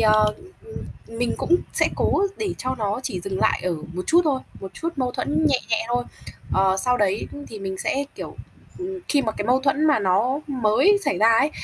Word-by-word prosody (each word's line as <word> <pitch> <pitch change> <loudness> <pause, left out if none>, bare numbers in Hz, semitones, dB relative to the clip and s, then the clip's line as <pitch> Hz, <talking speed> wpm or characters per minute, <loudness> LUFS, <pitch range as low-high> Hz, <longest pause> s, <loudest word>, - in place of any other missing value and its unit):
ờ, 215 -1 +4 0.3
ừm, 445 - -11 0.4
mình 245 0 0
cũng 350 - +3 0.2
sẽ - - +2
cố 395 - +2 0.2
để 420 -3 -2
cho 255 +1 -2
nó 210 +1 -1
chỉ 185 -7 -3
dừng 190 +1 -4
lại - - +2
ở 180 - 0 0.2
một 180 +1 -3
chút 340 +2 +5
thôi, 275 -4 +1 0.2
một 190 -1 -8
chút 330 - -3
mâu 255 -2 -1
thuẫn 310 +4 0
nhẹ 275 -4 +3
nhẹ 225 0 +1
thôi. 245 0 0 0.5
Ờ, 190 0 +3
sau 250 +6 +1
đấy 205 -2 +1 0.2
thì 215 - -8
mình 190 -1 -5
sẽ, 275 +7 0
kiểu, - - -8 0.4
ừm, 375 +1 -4
khi 285 -2 +3
mà 220 -3 -1
cái 205 -1 -4
mâu 255 +2 +3
thuẫn 280 +3 +1
mà 300 -6 +4
nó 210 +8 +1
mới 265 - +3
xảy 175 - 0
ra 220 +3 +5
ấy, 285 +5 +3
245 Hz, 215 wpm, -23 LUFS, 205-285 Hz, 0.5 s, chút